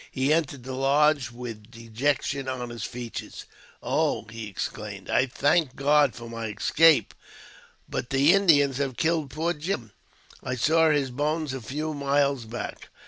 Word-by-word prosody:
He 135 Hz, +3 st, +1 dB
entered 145 Hz, -5 st, -1 dB
the 130 Hz, +1 st, -6 dB
lodge 140 Hz, 0 st, +2 dB
with 120 Hz, -3 st, -9 dB
dejection 130 Hz, +4 st, -2 dB
on 125 Hz, -2 st, -4 dB
his 115 Hz, -3 st, -6 dB
features. 120 Hz, -2 st, -7 dB, 0.4 s
"Oh?" -, -, 0 dB
he 115 Hz, -1 st, -6 dB
exclaimed, 100 Hz, -, -6 dB
I 135 Hz, -, +3 dB
thank 145 Hz, +2 st, +1 dB
God 145 Hz, -1 st, +3 dB
for 120 Hz, 0 st, -9 dB
my 115 Hz, -1 st, -5 dB
escape, 155 Hz, +9 st, +3 dB, 0.7 s
but 120 Hz, -, -4 dB
the 140 Hz, +4 st, +4 dB
Indians 145 Hz, -9 st, +4 dB
have 135 Hz, -3 st, -2 dB
killed 160 Hz, -3 st, 0 dB
poor 160 Hz, +6 st, -1 dB
Jim. 150 Hz, -, -4 dB, 0.5 s
I 125 Hz, -, -3 dB
saw 160 Hz, +5 st, +3 dB
his 140 Hz, -4 st, +1 dB
bones 150 Hz, +2 st, -1 dB
a 130 Hz, -, -5 dB
few 150 Hz, +7 st, -4 dB
miles 140 Hz, -3 st, +1 dB
back. 115 Hz, +2 st, -7 dB
135 Hz, 150 wpm, -26 LUFS, 120-150 Hz, 0.7 s, the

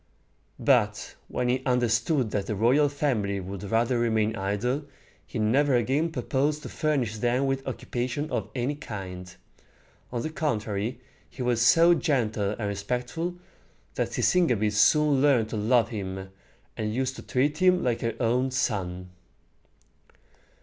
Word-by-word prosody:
But -, -, +1 dB
when 125 Hz, -, -2 dB
he 125 Hz, +1 st, +1 dB
understood 125 Hz, +1 st, +1 dB
that 100 Hz, -1 st, -2 dB
the 105 Hz, -, -2 dB
royal 130 Hz, +8 st, +3 dB
family 120 Hz, -9 st, -1 dB
would 95 Hz, 0 st, -7 dB
rather 120 Hz, +3 st, +1 dB
remain 110 Hz, -2 st, +1 dB
idle, 115 Hz, +9 st, -1 dB, 0.4 s
he -, -, -6 dB
never 130 Hz, +6 st, +3 dB
again 140 Hz, +7 st, +1 dB
proposed 145 Hz, +2 st, -1 dB
to -, -, -6 dB
furnish 130 Hz, -9 st, -1 dB
them 125 Hz, +4 st, +1 dB
with 135 Hz, 0 st, -2 dB
occupation 130 Hz, +2 st, -3 dB
of -, -, -2 dB
any 125 Hz, +3 st, -1 dB
kind. 95 Hz, -9 st, -8 dB, 0.8 s
On 120 Hz, -1 st, -3 dB
the 155 Hz, -, -3 dB
contrary, 115 Hz, -6 st, -2 dB, 0.3 s
he 130 Hz, -, -6 dB
was 120 Hz, -2 st, +1 dB
so 165 Hz, +8 st, +6 dB
gentle 110 Hz, -10 st, 0 dB
and 105 Hz, -, -3 dB
respectful, 125 Hz, -, -3 dB, 0.6 s
that -, -, -1 dB
Sisygambis 115 Hz, -, +2 dB
soon 145 Hz, +5 st, +4 dB
learned 130 Hz, -7 st, +3 dB
to -, -, -4 dB
love 115 Hz, +2 st, +3 dB
him, 95 Hz, -3 st, -5 dB, 0.4 s
and 105 Hz, 0 st, -3 dB
used 130 Hz, 0 st, -1 dB
to -, -, -7 dB
treat 145 Hz, +5 st, 0 dB
him 185 Hz, -1 st, +4 dB
like 120 Hz, -2 st, 0 dB
her 115 Hz, -1 st, -2 dB
own 125 Hz, +2 st, +1 dB
son. 90 Hz, -8 st, -2 dB
120 Hz, 145 wpm, -27 LUFS, 105-140 Hz, 0.8 s, so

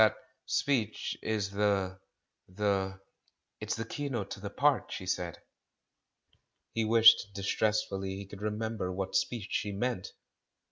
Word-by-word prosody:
That 110 Hz, -, +6 dB, 0.3 s
speech 115 Hz, -7 st, 0 dB
is 105 Hz, -3 st, -1 dB
the 100 Hz, -2 st, +1 dB, 0.2 s
— -, -, -54 dB
the 95 Hz, -2 st, +1 dB, 0.3 s
" -, -, -52 dB
"It's -, -, -1 dB
the 115 Hz, +1 st, -3 dB
keynote 120 Hz, -6 st, -3 dB
to -, -, -5 dB
the 100 Hz, +1 st, -5 dB
part," 140 Hz, +3 st, +2 dB
she 95 Hz, -, -5 dB
said. 90 Hz, -2 st, -2 dB, 1.4 s
He 115 Hz, -, +1 dB
wished 110 Hz, -2 st, +7 dB
distressfully 100 Hz, -1 st, 0 dB
he 100 Hz, +1 st, -6 dB
could 100 Hz, +1 st, -11 dB
remember 105 Hz, -2 st, -2 dB
what 95 Hz, +1 st, -3 dB
speech 115 Hz, -5 st, 0 dB
she 105 Hz, -, 0 dB
meant. 105 Hz, 0 st, -2 dB
105 Hz, 140 wpm, -31 LUFS, 95-110 Hz, 1.4 s, wished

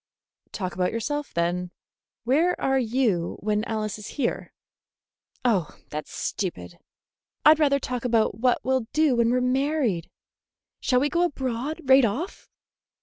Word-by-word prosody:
"Talk 185 Hz, -3 st, -4 dB
about 180 Hz, 0 st, 0 dB
yourself, 290 Hz, +6 st, -3 dB
then. 175 Hz, +1 st, -1 dB, 0.5 s
Where 310 Hz, +9 st, +2 dB
are 270 Hz, 0 st, +2 dB
you 225 Hz, -8 st, 0 dB
when 210 Hz, +1 st, 0 dB
Alice 215 Hz, -2 st, -3 dB
is 210 Hz, -, -8 dB
here?" 265 Hz, -4 st, -2 dB, 0.9 s
"Oh, 195 Hz, -10 st, +1 dB
that's 150 Hz, 0 st, -5 dB
stupid. 90 Hz, -, -4 dB, 0.7 s
I'd 310 Hz, +1 st, +8 dB
rather 280 Hz, -2 st, +4 dB
talk 250 Hz, -2 st, -4 dB
about 225 Hz, -4 st, +1 dB
what 250 Hz, +1 st, +3 dB
we'll 260 Hz, -3 st, +1 dB
do 305 Hz, -4 st, +3 dB
when 235 Hz, -1 st, +3 dB
we 250 Hz, -, +2 dB
are -, -, +1 dB
married. 255 Hz, -, 0 dB, 0.7 s
Shall 250 Hz, -2 st, +2 dB
we 285 Hz, -, +3 dB
go 340 Hz, +3 st, +1 dB
abroad 275 Hz, -1 st, -2 dB
right 265 Hz, 0 st, +6 dB
off?" 250 Hz, -, -2 dB
245 Hz, 145 wpm, -25 LUFS, 210-275 Hz, 0.9 s, I'd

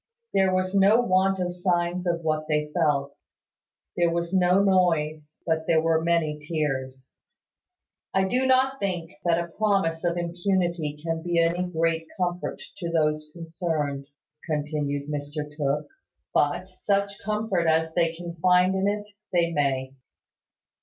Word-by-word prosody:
There 190 Hz, -1 st, +3 dB
was 185 Hz, 0 st, 0 dB
no 200 Hz, +3 st, +5 dB
want 190 Hz, -3 st, +2 dB
of 180 Hz, -1 st, -1 dB
signs 180 Hz, 0 st, 0 dB
of 170 Hz, -1 st, 0 dB
what 155 Hz, -1 st, -1 dB
they 150 Hz, -1 st, 0 dB
felt. 145 Hz, -4 st, 0 dB, 0.8 s
There 170 Hz, -1 st, +3 dB
was 170 Hz, +1 st, -2 dB
no 185 Hz, +1 st, +4 dB
noise; 155 Hz, -5 st, +1 dB
but 160 Hz, -1 st, 0 dB
there 160 Hz, -, +4 dB
were 160 Hz, 0 st, +2 dB
many 165 Hz, -3 st, +1 dB
tears. 135 Hz, -4 st, -3 dB, 1.0 s
"I 190 Hz, -, +2 dB
do 250 Hz, +7 st, +1 dB
not 265 Hz, +1 st, +3 dB
think 175 Hz, -4 st, -2 dB
that 170 Hz, -1 st, +3 dB
a 170 Hz, 0 st, -2 dB
promise 195 Hz, -5 st, +1 dB
of 175 Hz, 0 st, 0 dB
impunity 175 Hz, -3 st, -1 dB
can 165 Hz, -1 st, -2 dB
be 175 Hz, 0 st, -1 dB
any 170 Hz, +1 st, +2 dB
great 165 Hz, -1 st, 0 dB
comfort 180 Hz, -1 st, -2 dB, 0.2 s
to 170 Hz, -, -3 dB
those 155 Hz, -2 st, 0 dB
concerned," 160 Hz, -4 st, -3 dB, 0.4 s
continued 145 Hz, -2 st, -2 dB
Mr 150 Hz, 0 st, -5 dB
Tooke: 145 Hz, 0 st, -1 dB, 0.5 s
"but 150 Hz, +5 st, +1 dB
such 200 Hz, +1 st, -1 dB
comfort 210 Hz, -5 st, -1 dB
as 160 Hz, 0 st, +2 dB
they 165 Hz, -1 st, +1 dB
can 170 Hz, 0 st, -7 dB
find 180 Hz, +2 st, +4 dB
in 190 Hz, +1 st, +1 dB
it, 205 Hz, 0 st, -1 dB, 0.2 s
they 170 Hz, -1 st, +2 dB
may. 135 Hz, -3 st, 0 dB
170 Hz, 145 wpm, -26 LUFS, 155-185 Hz, 1.0 s, no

